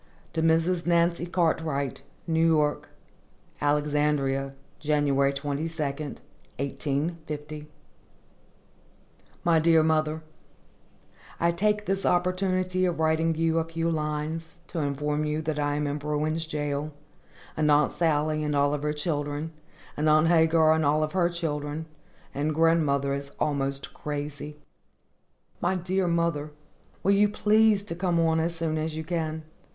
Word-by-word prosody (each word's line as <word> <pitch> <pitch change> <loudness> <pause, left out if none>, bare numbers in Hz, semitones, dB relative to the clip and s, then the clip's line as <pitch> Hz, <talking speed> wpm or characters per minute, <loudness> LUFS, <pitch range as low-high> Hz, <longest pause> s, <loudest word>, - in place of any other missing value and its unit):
To 160 - 0
Mrs. 165 +2 +2
NANCY 170 0 +2
CARTWRIGHT, 160 -6 0 0.2
New 165 -1 +2
York. 150 -2 +1 0.7
Alexandria, 145 -2 +1 0.2
Jan. 150 0 +1
22, 140 0 +1 0.4
1850. 150 +1 -4 1.8
MY 165 -2 +4
DEAR 160 0 +5
MOTHER: 155 0 +1 1.2
I 170 0 +3
take 210 +4 0
this 195 0 -1
opportunity 185 +1 +1
of 175 -3 -1
writing 160 +1 +2
you 165 0 +1
a - - +1
few 165 +1 -2
lines, 155 +1 -3
to 165 - -3
inform 150 +1 -1
you 150 0 -1
that 155 -1 -2
I 145 0 0
am 150 0 -1
in 145 +1 -2
Bruin's 155 +2 -1
Jail, 145 -1 -2 0.6
and 155 -1 +1
Aunt 150 0 +4
Sally 155 -2 +1
and 150 -1 -1
all 145 0 +3
of 145 - -2
her 150 0 -1
children, 150 0 -2 0.4
and 155 +1 +1
Aunt 155 +2 +5
Hagar 160 -1 +5
and 160 0 +1
all 155 +1 +2
her 175 +1 +1
children, 155 -2 -3 0.5
and 150 +2 -1
grandmother 150 -4 +2
is 140 0 -4
almost 140 -2 -1
crazy. 145 0 -5 1.0
My 180 +2 +1
dear 185 +1 0
mother, 170 -3 0 0.5
will 195 - +3
you 205 +1 +4
please 210 0 +3
to 185 - -6
come 175 -1 0
on 160 -1 +3
as 165 +1 -1
soon 160 -1 -1
as 155 0 -3
you 160 - -3
can? 160 -2 -3
155 Hz, 135 wpm, -27 LUFS, 150-170 Hz, 1.8 s, DEAR